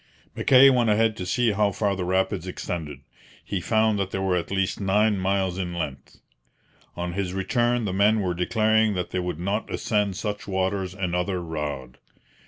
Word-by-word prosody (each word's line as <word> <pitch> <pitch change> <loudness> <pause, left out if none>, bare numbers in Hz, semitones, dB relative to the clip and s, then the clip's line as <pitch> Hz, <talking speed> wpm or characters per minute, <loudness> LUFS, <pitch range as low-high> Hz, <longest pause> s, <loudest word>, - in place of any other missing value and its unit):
Mackay 135 +1 +6
went 120 -3 +2
ahead 110 +1 +2
to 90 - -5
see 120 +2 +2
how 105 0 +1
far 100 -2 0
the 95 - -3
rapids 95 -1 0
extended. 80 -6 -5 0.4
He 100 -3 -3
found 110 +1 +2
that 95 -1 -1
they 95 - -4
were 95 -1 0
at 85 - -2
least 95 +1 -1
nine 105 +1 +2
miles 95 -1 0
in 90 -2 -3
length. 70 -5 -6 0.8
On 90 0 -4
his 95 -1 -2
return 120 +4 0
the 95 - -2
men 105 +3 +3
were 90 -3 -1
declaring 110 +3 +2
that 90 -1 -3
they 90 - -1
would 90 -3 -4
not 100 +5 -2
ascend 105 -3 0
such 105 +2 -4
waters 95 -1 -1
another 90 0 -1
rod. 75 -6 -5
95 Hz, 180 wpm, -25 LUFS, 90-105 Hz, 0.8 s, Mackay